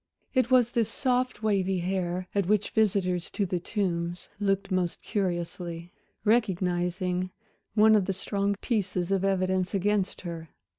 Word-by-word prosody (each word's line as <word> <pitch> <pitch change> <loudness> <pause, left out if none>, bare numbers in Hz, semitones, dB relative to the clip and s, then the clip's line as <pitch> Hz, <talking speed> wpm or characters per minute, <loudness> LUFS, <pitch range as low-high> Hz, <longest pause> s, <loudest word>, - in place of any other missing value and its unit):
It 255 -2 +2
was 250 -2 +4
this 230 -3 +1
soft, 250 -2 0
wavy 195 -3 +1
hair 180 0 -2
at 200 -3 +1
which 210 0 +2
visitors 185 -5 +1
to 200 - -1
The 180 -1 -1
Tombs 175 -2 -2
looked 195 -1 0
most 180 -2 -1
curiously, 175 -3 -3 0.3
recognizing 185 -4 +1 0.5
one 220 0 +6
of 205 -3 +4
the 195 - -1
strong 200 +1 -1
pieces 190 -6 -1
of 195 -1 +2
evidence 190 0 +1
against 200 0 0
her. 165 -3 -6
190 Hz, 140 wpm, -28 LUFS, 180-210 Hz, 0.5 s, one